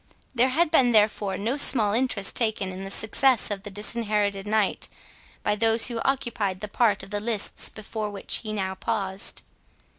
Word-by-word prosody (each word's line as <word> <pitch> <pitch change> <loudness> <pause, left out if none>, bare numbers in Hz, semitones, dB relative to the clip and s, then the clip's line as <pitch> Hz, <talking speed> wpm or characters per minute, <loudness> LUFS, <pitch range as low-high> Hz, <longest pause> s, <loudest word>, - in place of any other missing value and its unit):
There 255 +1 +2
had 315 +4 +1
been 250 -6 +3
therefore 210 -3 +2
no 225 +8 -2
small 220 -7 +7
interest 225 -5 0
taken 220 -5 0
in 185 +1 -8
the 195 - -7
success 225 +3 +2
of 200 -1 -4
the 205 - -8
Disinherited 210 -1 -2
Knight, 215 -2 0 0.5
by 210 - 0
those 225 +2 +2
who 235 -1 -4
occupied 235 -8 -2
the 210 - -6
part 210 -1 +1
of 195 - -12
the 205 - -2
lists 215 -1 0
before 215 0 -6
which 200 -1 -4
he 215 - -7
now 190 -3 -3
paused. 195 -1 -2
215 Hz, 175 wpm, -24 LUFS, 200-235 Hz, 0.5 s, small